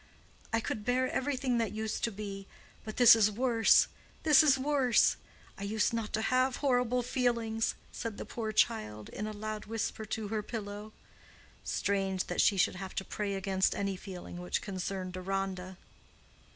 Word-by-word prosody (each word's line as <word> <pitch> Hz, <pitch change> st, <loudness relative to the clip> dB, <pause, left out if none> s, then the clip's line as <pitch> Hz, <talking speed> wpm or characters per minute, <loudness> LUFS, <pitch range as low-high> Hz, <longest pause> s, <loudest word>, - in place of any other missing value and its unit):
"I 225 Hz, -, +2 dB
could 215 Hz, -, -4 dB
bear 250 Hz, +3 st, +1 dB
everything 260 Hz, -2 st, 0 dB
that 225 Hz, -4 st, -1 dB
used 220 Hz, 0 st, -3 dB
to 230 Hz, -, -2 dB
be—but 200 Hz, +1 st, -9 dB
this 240 Hz, -2 st, +9 dB
is 215 Hz, -2 st, +4 dB
worse—this 245 Hz, +6 st, +3 dB
is 285 Hz, -4 st, +5 dB
worse,—I 265 Hz, -7 st, +1 dB
used 210 Hz, +3 st, 0 dB
not 225 Hz, -2 st, -2 dB
to 220 Hz, -, 0 dB
have 255 Hz, +2 st, +2 dB
horrible 250 Hz, -3 st, +1 dB
feelings!" 235 Hz, -3 st, 0 dB, 0.2 s
said 230 Hz, -3 st, -5 dB
the -, -, -6 dB
poor 220 Hz, -2 st, -4 dB
child 105 Hz, -, 0 dB
in 210 Hz, -, -5 dB
a -, -, -4 dB
loud 215 Hz, 0 st, -5 dB
whisper 225 Hz, 0 st, -3 dB
to 215 Hz, 0 st, -4 dB
her 215 Hz, 0 st, -1 dB
pillow. 210 Hz, -1 st, -6 dB, 0.7 s
Strange 195 Hz, -2 st, 0 dB
that 175 Hz, -, 0 dB
she 200 Hz, -, +4 dB
should 185 Hz, -, +2 dB
have 190 Hz, 0 st, -7 dB
to 190 Hz, -, -2 dB
pray 205 Hz, -2 st, -3 dB
against 190 Hz, -1 st, +1 dB
any 200 Hz, -1 st, -1 dB
feeling 180 Hz, -2 st, -8 dB
which 180 Hz, -, -2 dB
concerned 185 Hz, -1 st, -4 dB
Deronda! 185 Hz, 0 st, -3 dB
215 Hz, 155 wpm, -31 LUFS, 195-235 Hz, 0.7 s, this